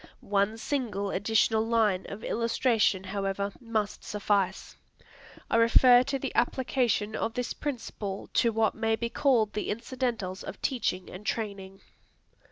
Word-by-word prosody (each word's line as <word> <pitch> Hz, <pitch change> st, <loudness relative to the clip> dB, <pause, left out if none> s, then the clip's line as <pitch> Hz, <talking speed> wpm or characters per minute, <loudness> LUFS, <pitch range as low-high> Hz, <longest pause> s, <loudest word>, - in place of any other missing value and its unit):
One 200 Hz, +2 st, +2 dB
single 220 Hz, -7 st, -2 dB
additional 220 Hz, +2 st, +2 dB
line 220 Hz, -5 st, +1 dB
of 200 Hz, +2 st, -8 dB
illustration, 230 Hz, -4 st, +1 dB
however, 195 Hz, 0 st, -2 dB
must 220 Hz, -3 st, -2 dB
suffice. 200 Hz, -2 st, -1 dB, 0.7 s
I -, -, +2 dB
refer 245 Hz, +2 st, +7 dB
to 275 Hz, +1 st, -1 dB
the 270 Hz, 0 st, -4 dB
application 240 Hz, -4 st, +1 dB
of 225 Hz, -, -2 dB
this 250 Hz, -1 st, -2 dB
principle 225 Hz, -8 st, -5 dB
to 235 Hz, -, +3 dB
what 220 Hz, -1 st, +1 dB
may 225 Hz, 0 st, 0 dB
be 235 Hz, +1 st, -3 dB
called 235 Hz, -7 st, +2 dB
the 210 Hz, -, -3 dB
incidentals 230 Hz, -4 st, -3 dB
of -, -, -8 dB
teaching 195 Hz, -8 st, -1 dB
and 185 Hz, +3 st, -9 dB
training. 200 Hz, -3 st, -4 dB
220 Hz, 135 wpm, -28 LUFS, 200-235 Hz, 0.7 s, refer